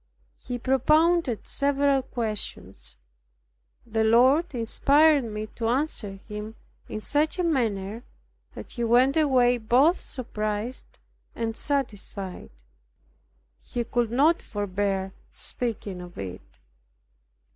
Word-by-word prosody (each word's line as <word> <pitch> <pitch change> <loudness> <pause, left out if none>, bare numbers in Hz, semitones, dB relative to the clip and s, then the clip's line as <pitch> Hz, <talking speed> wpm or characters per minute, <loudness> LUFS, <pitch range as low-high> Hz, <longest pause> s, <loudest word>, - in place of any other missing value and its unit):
He 245 - -5
propounded 270 +2 +2
several 280 -1 +1
questions. 215 - -5 0.9
The 220 -1 0
Lord 260 +8 +4
inspired 285 +5 +4
me 215 -1 -4
to 230 - -2
answer 245 -5 -1
him 210 0 -6 0.3
in 215 - -4
such 300 - 0
a 360 - 0
manner, 225 - -1 0.5
that - - -9
he 240 - -4
went 245 +4 +4
away 255 -6 +3
both 255 +10 +3
surprised 215 -1 -4 0.4
and 225 -1 -2
satisfied. 205 - -3 1.1
He 240 - -3
could 235 0 0
not 290 +8 +3
forbear 195 -2 -2 0.2
speaking 210 -6 -3
of 175 0 -11
it. 95 -2 -8
235 Hz, 105 wpm, -26 LUFS, 210-275 Hz, 1.1 s, Lord